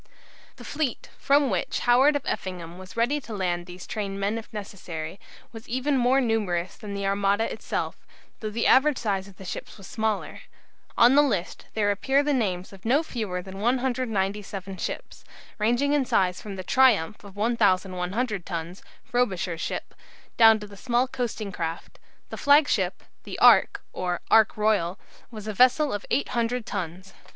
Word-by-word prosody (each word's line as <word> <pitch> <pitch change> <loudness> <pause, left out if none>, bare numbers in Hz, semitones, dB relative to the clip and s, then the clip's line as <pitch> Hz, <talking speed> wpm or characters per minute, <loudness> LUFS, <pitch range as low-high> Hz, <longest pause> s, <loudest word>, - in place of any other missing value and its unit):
The - - -12
fleet, 290 -5 -3
from 280 -2 +3
which 185 - -1
Howard 260 +5 +5
of 285 - -1
Effingham 180 -2 -5
was 185 +3 -12
ready 265 +6 +1
to 225 -4 -7
land 175 -2 -2
these 180 0 -9
trained 200 -2 -4
men 205 +3 -1
if 225 - -13
necessary, 185 -5 -7 0.3
was 225 0 -11
even 260 +4 0
more 255 +1 +3
numerous 205 -8 -1
than 205 -1 -7
the 200 0 -3
Armada 200 +2 +2
itself, - - -3 0.4
though 215 - -4
the 230 +2 -2
average 275 +1 +5
size 195 -4 -2
of 195 - -16
the 190 - -11
ships - - -7
was 195 - -12
smaller. 220 +1 -2 0.6
On 240 +2 +7
the 290 - +7
list 205 -11 -2
there 205 -2 +2
appear 270 +8 +2
the 295 0 +1
names 190 -7 -1
of 190 - -14
no 270 +8 +3
fewer 210 - -4
than 190 +1 -9
197 210 -6 -1
ships, - - -6 0.4
ranging 240 +7 +2
in 290 -2 +3
size 185 -7 +1
from 205 -2 -7
the 185 - -6
"Triumph" 215 -5 +3
of 200 -1 -13
1100 200 -1 0
tons 170 +1 -5 0.2
(Frobisher's 185 -9 -1
ship) - - -4 0.4
down 225 -1 +7
to 205 -1 -9
small 245 +3 +1
coasting 230 -5 -4
craft. 165 -2 -5 0.3
The - - -5
flagship, 285 +1 +3 0.2
the - - -7
"Ark," - - +5
or 180 -1 -2
"Ark 220 -1 +5
Royal," 205 -4 +1 0.3
was 215 -3 -9
a 215 - -2
vessel 255 +7 +4
of 205 - -5
800 240 -3 0
tons. 185 0 -5
210 Hz, 165 wpm, -26 LUFS, 190-245 Hz, 0.6 s, On